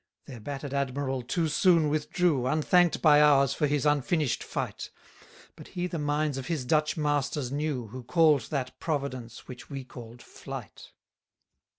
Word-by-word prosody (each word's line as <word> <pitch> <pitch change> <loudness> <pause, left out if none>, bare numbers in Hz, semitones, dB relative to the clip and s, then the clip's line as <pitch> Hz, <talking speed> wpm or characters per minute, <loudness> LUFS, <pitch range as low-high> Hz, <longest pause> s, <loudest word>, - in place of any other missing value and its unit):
192 - - -11
Their 115 -3 -11
batter'd 140 +1 -5
admiral 135 -1 -2
too 160 +7 -1
soon 165 +1 +3
withdrew, 150 -2 0
Unthank'd 165 +4 +2
by 150 -2 +7
ours 140 -3 +5
for 150 - 0
his 145 0 0
unfinish'd 145 -2 +1
fight; - - -5 0.7
But - - -12
he 175 0 -4
the 175 -2 -4
minds 145 -1 -1
of 130 - -7
his 155 -7 -2
Dutch 155 +4 +1
masters 145 -3 -1
knew, 140 -5 -2
Who 130 +4 -8
call'd 150 -1 +3
that 135 -4 -4
Providence 130 -7 -4
which 125 -1 -10
we 135 -2 -6
call'd 120 -1 -12
flight. - - -10
145 Hz, 160 wpm, -28 LUFS, 130-155 Hz, 0.7 s, by